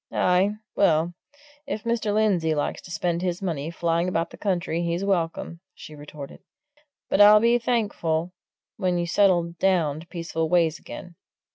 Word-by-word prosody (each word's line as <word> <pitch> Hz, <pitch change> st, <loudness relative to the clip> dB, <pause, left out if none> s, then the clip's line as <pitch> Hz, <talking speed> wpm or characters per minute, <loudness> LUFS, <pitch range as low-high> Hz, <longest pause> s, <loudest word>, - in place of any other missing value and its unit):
"Aye, 185 Hz, +3 st, +2 dB, 0.2 s
well, 170 Hz, -2 st, +2 dB, 0.5 s
if 220 Hz, -6 st, -4 dB
Mr. 230 Hz, -3 st, -1 dB
Lindsey 195 Hz, -7 st, +1 dB
likes 145 Hz, -, -2 dB
to -, -, -13 dB
spend 175 Hz, 0 st, -1 dB
his 180 Hz, -1 st, -2 dB
money 165 Hz, -6 st, -3 dB
flying 170 Hz, +1 st, 0 dB
about 165 Hz, -2 st, -1 dB
the -, -, -10 dB
country, 175 Hz, -4 st, -1 dB
he's 170 Hz, +2 st, -2 dB
welcome!" 170 Hz, -3 st, -2 dB, 0.2 s
she 155 Hz, -, -11 dB
retorted. 145 Hz, -1 st, -10 dB, 0.7 s
"But 205 Hz, -, +2 dB
I'll 210 Hz, +1 st, +9 dB
be 235 Hz, +2 st, +3 dB
thankful 190 Hz, -8 st, -1 dB, 0.5 s
when 185 Hz, -3 st, 0 dB
you 175 Hz, -, -1 dB
settle 175 Hz, -2 st, +2 dB
down 165 Hz, -6 st, +1 dB
to 165 Hz, -, -13 dB
peaceful 165 Hz, -2 st, -3 dB
ways 165 Hz, -3 st, +2 dB
again. 175 Hz, -2 st, -10 dB
175 Hz, 155 wpm, -24 LUFS, 165-195 Hz, 0.7 s, I'll